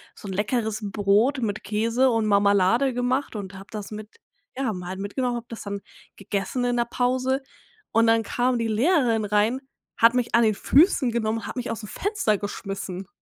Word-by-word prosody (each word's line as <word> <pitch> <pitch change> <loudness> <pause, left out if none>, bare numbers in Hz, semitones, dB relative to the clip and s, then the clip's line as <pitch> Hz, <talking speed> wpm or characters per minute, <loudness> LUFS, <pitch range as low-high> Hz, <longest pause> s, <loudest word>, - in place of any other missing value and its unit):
so 205 - -10
'n 190 - -4
leckeres 215 +2 -1
Brot 210 +7 +2
mit 215 -3 -2
Käse 230 +5 +1
und 225 -2 +1
Mamalade 205 +5 +3
gemacht 250 0 -1
und 200 -2 -6
habe 195 +1 -11
das 210 -1 -6
mit 215 0 -7 0.5
ja, 255 -5 -1
mal 180 +1 -6
mitgenommen, 240 +5 -2
habe 235 0 -5
das 230 - -7
dann 200 -1 -5 0.3
gegessen 200 +5 -3
in 245 0 +1
'ner 235 - +2
Pause. 255 +2 0 0.5
Und 230 +1 +4
dann 225 0 +4
kam 245 +3 0
die 230 -1 -1
Lehrerin 235 - +2
rein, 210 +5 +2 0.4
hat 230 +1 +6
mich 250 -2 0
an 235 - +5
den 215 -2 +3
Füßen 280 - +4
genommen, 225 -1 -1
hat - - -6
mich 245 - -3
aus'm 225 -2 -6
Fenster 390 - 0
geschmissen. 195 -2 -5
225 Hz, 180 wpm, -24 LUFS, 205-245 Hz, 0.5 s, hat